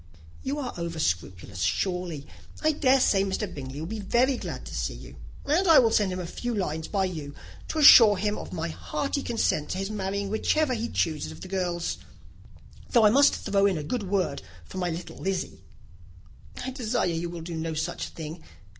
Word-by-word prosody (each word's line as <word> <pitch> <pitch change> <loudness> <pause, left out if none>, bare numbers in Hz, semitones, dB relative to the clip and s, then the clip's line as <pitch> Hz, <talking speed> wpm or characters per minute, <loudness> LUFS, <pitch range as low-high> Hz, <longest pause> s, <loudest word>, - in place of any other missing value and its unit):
"You 275 +2 -3
are 265 -4 -4
over 170 -1 -4
scrupulous, 90 - -2
surely. 170 - -1 0.4
I 310 - +4
dare 270 -3 +3
say 195 -6 +3
Mr. 200 +2 -1
Bingley 140 -6 -7
will - - -4
be 215 +5 -5
very 240 +7 +2
glad - - -6
to - - -9
see - - -2
you; - - -11 0.3
and 340 +7 +2
I 325 - +8
will 230 -3 +5
send 205 -4 +2
a 180 -1 -4
few 240 +7 -4
lines 160 -5 -2
by 195 -2 0
you 155 -6 -6 0.3
to - - -4
assure 230 -8 +9
him 205 +2 0
of - - -7
my 170 -1 -3
hearty 280 - -3
consent 225 - 0
to - - -2
his 195 +2 -3
marrying 200 -1 -3
whichever 280 +6 +1
he 235 0 -2
chooses 155 - -1
of 80 +2 -12
the - - -7
girls 180 -3 -2 0.9
though 235 -4 +5
I 210 - +7
must 280 +4 +5
throw 200 0 +2
in 190 -4 0
a 150 - -4
good 205 +3 -3
word 185 -8 0 0.2
for 185 - -7
my 180 -1 0
little 170 +1 -6
Lizzy." 190 -1 -3 1.1
"I 260 - -3
desire 245 -2 -1
you 170 0 -2
will 170 -1 -7
do 170 +1 -6
no 160 0 -3
such 160 +3 -3
thing. 160 0 -8
190 Hz, 200 wpm, -27 LUFS, 165-230 Hz, 1.1 s, assure